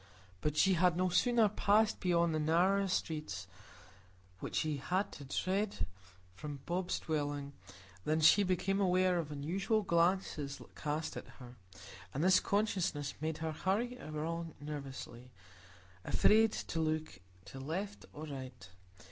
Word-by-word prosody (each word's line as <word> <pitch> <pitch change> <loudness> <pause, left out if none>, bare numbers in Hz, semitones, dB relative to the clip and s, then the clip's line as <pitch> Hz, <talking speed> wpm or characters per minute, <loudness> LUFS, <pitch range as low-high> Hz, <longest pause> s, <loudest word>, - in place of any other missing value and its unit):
But 150 0 -1
she 190 +3 +5
had 175 -1 +3
no 185 0 +2
sooner 230 +5 +4
passed 210 +1 +3
beyond 170 -2 +2
the 155 - +1
narrower 180 +6 +3
streets 150 - -2 0.9
which - - -5
she 155 -2 0
had 185 +9 -1
to 145 - -9
thread 195 +8 -1 0.5
from 145 +7 -7
Bob's 180 +1 -1
dwelling, 145 -3 -2 0.5
than 155 +1 +1
she 160 +6 +7
became 195 +1 +1
aware 185 -1 +3
of 155 -3 -4
unusual 190 +9 0
glances 170 -5 +1 0.2
cast 155 +1 -3
at - - -7
her; 125 -2 -11 0.6
and 145 - 0
this 185 +1 +6
consciousness 185 -8 0
made 160 0 -2
her 160 - -1
hurry 205 +10 -1
along 160 +2 -4
nervously, 135 -4 -7 0.7
afraid 220 - +4
to 165 - -4
look 155 -8 -1 0.3
to 135 - -9
right 185 +9 -4
or 155 - -7
left. 130 -9 -8
165 Hz, 135 wpm, -34 LUFS, 145-190 Hz, 0.9 s, she